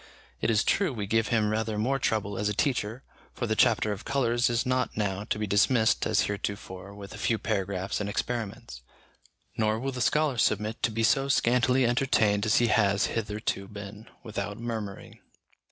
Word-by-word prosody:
It - - +1
is 110 -1 +3
true 200 -5 +1
we 110 -5 -4
give 110 +2 +1
him 110 -2 +1
rather 110 0 -1
more 130 +6 0
trouble 105 -4 -1
as 105 - 0
a 105 - -2
teacher, 125 -1 -1 0.3
for 120 - -2
the 110 -1 0
chapter 110 -2 +3
of 100 0 -5
colours 120 -3 +1
is 120 0 0
not 125 -2 0
now 100 -1 -1
to 105 - -2
be 105 - -1
dismissed 110 +3 +3
as - - +3
heretofore 100 -1 -4
with 100 -1 -10
a 105 - -9
few 115 +1 +1
paragraphs 100 -2 -2
and 100 - -2
experiments; 110 - -4 0.8
nor 110 0 +1
will 135 +3 -2
the 125 -1 -5
scholar 140 +2 +2
submit 105 +1 0
to 115 - +2
be 115 +1 -2
so 135 +4 +3
scantily 125 0 +3
entertained 115 -5 +2
as 110 - +3
he 120 - +4
has 100 -2 +3
hitherto 105 -2 -3
been, 105 +2 -9 0.2
without 105 -3 -4
murmuring. 110 -4 -6
110 Hz, 185 wpm, -28 LUFS, 105-120 Hz, 0.8 s, he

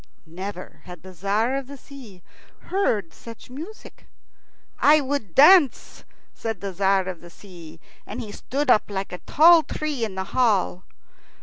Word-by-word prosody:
Never 185 +3 -9
had 180 -2 -12
the 190 - -11
Tzar 205 +8 -1
of 275 -2 -4
the 280 +1 -10
Sea 245 -11 -14 0.5
heard 215 - 0
such 230 +1 -13
music. 330 +12 -11 0.7
"I 300 +1 +5
would 265 - -4
dance," 300 -1 +4 0.3
said 225 -4 -5
the 200 -1 -6
Tzar 190 0 +1
of 185 -3 -6
the 175 - -13
Sea, 170 -4 -14 0.3
and 215 - -7
he 220 -4 -7
stood 275 +5 -2
up 215 - +2
like 195 -1 -5
a 180 - -7
tall 330 +2 +5
tree 305 -5 -4
in 210 -4 -4
the 190 - -3
hall. 205 -7 +1
215 Hz, 160 wpm, -23 LUFS, 190-275 Hz, 0.7 s, I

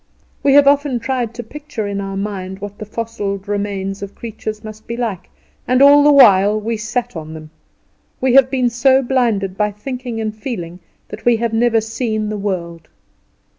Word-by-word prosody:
We 275 -1 +4
have 285 0 +7
often 280 -3 +3
tried 240 -1 -2
to 240 - -6
picture 290 -2 -6
in 200 0 -3
our 195 0 -5
mind 190 -2 -4
what 205 0 -8
the 215 - -7
fossiled 205 -3 -4
remains 200 -1 -3
of 200 0 -7
creatures 215 -1 -6
must 215 0 -10
be 235 - -4
like, 210 -7 -4 0.4
and 255 +1 +3
all 285 +1 +7
the 295 - +6
while 210 -6 +6
we 225 +2 -2
sat 230 +2 -3
on 160 -1 -7
them, 155 -1 -11 0.7
we 260 -1 +1
have 265 -1 +6
been 255 -2 +1
so 260 +3 +3
blinded 230 -7 0
by 210 +1 +1
thinking 245 +2 -6
and 215 -1 -3
feeling 180 -7 -6 0.3
that - - -9
we 240 -1 +4
have 230 0 -2
never 230 0 +3
seen 220 -1 -2
the 215 - -3
world. 170 -5 -4
220 Hz, 185 wpm, -18 LUFS, 200-245 Hz, 0.7 s, have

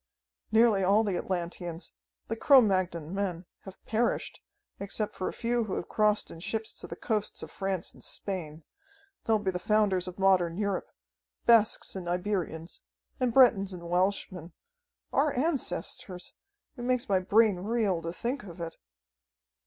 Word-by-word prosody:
Nearly 220 -3 +5
all 200 +4 +4
the 200 -4 -1
Atlanteans, 175 -1 -4 0.3
the 225 - -2
Cro 275 +4 +7
Magnon 185 -7 0
men, 190 -3 -2 0.2
have 190 -1 -10
perished, 230 +2 -1 0.4
except 200 +1 -3
for 185 - -3
a - - -1
few 235 -1 0
who 195 - -3
have - - -4
crossed 210 -1 +2
in 165 - -10
ships 220 +5 -3
to - - -8
the - - -6
coasts 215 -3 -2
of - - -8
France 190 -2 -3
and - - -17
Spain. 165 -5 -4 0.6
They'll 220 -1 +3
be 200 -3 -1
the 180 - -3
founders 200 -2 +2
of 180 - -7
modern 185 -3 +3
Europe 200 -2 -1 0.6
Basques 230 -3 +4
and 180 -2 -5
Iberians, 180 -3 -3 0.4
and 250 -2 +2
Bretons 225 -7 +5
and 170 -1 -8
Welshmen. 180 -2 -1 0.6
Our 285 0 +3
ancestors! 195 - -2 0.4
It 240 - -6
makes 250 0 0
my 195 -2 +3
brain 205 +1 +4
reel 200 -2 0
to 165 - -4
think 245 +9 -3
of 180 -3 -10
it!" 165 -1 -6
195 Hz, 155 wpm, -29 LUFS, 180-220 Hz, 0.6 s, Cro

